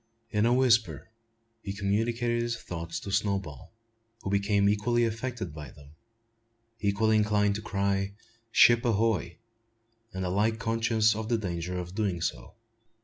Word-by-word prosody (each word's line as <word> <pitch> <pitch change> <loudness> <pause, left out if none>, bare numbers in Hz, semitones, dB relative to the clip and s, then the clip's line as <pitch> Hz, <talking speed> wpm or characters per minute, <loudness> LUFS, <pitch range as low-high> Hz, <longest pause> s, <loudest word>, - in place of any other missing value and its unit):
In 105 +1 +2
a 120 - +3
whisper 115 - +2 0.5
he 95 - -5
communicated 115 +4 0
his 120 -1 -2
thoughts 85 -6 -6
to 100 - -6
Snowball, 95 -9 -2 0.5
who 95 - -3
became 100 0 +2
equally 115 +4 +2
affected 115 - -4
by 75 -3 -8
them, 70 +2 -16 0.9
equally 110 +2 +2
inclined 105 -1 +2
to 105 - -4
cry 100 -1 -1 0.4
"Ship 120 0 +6
ahoy!" 110 -7 0 0.7
and 95 -1 -4
alike 105 +5 +1
conscious 115 -1 +2
of 110 0 -4
the 120 - +2
danger 90 -3 -4
of 90 0 -6
doing 100 -4 -1
so. - - -4
105 Hz, 140 wpm, -28 LUFS, 95-115 Hz, 0.9 s, Ship